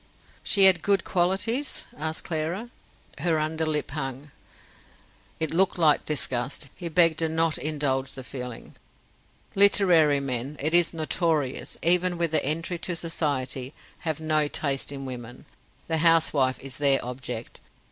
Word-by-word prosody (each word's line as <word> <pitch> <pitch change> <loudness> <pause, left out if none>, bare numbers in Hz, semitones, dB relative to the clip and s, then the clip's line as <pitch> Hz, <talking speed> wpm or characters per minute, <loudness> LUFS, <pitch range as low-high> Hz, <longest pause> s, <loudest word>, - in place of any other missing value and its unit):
"She 200 - +3
had 190 -3 +8
good 200 +1 +2
qualities?" 195 +10 -1
asked 160 +1 -3
Clara. 170 +9 -3 0.5
Her 165 -2 +1
under 155 +1 -1
lip 150 -2 -2
hung. 135 -1 -6 1.1
It 160 0 -1
looked 190 +3 +2
like 155 -4 +3
disgust; 135 -2 -2
he 175 -2 -6
begged 165 -1 +3
her 165 -1 0
not 160 0 +1
indulge 140 -3 -1
the 130 - -8
feeling. 125 -2 -8 0.8
"Literary 180 -7 +5
men, 135 +1 -3
it 155 +4 0
is 175 -2 +5
notorious, 155 -4 -2
even 180 +1 +2
with 170 -2 -1
the 155 -2 +2
entry 165 +4 -2
to 180 0 -2
society, 140 -5 -3 0.2
have 160 -3 -3
no 155 -1 +1
taste 140 -2 0
in 135 -1 -6
women. 125 +1 -8 0.4
The 160 - +1
housewife 155 -5 +3
is 135 0 -9
their 140 -2 +4
object. 125 -2 -7
155 Hz, 140 wpm, -26 LUFS, 135-170 Hz, 1.1 s, had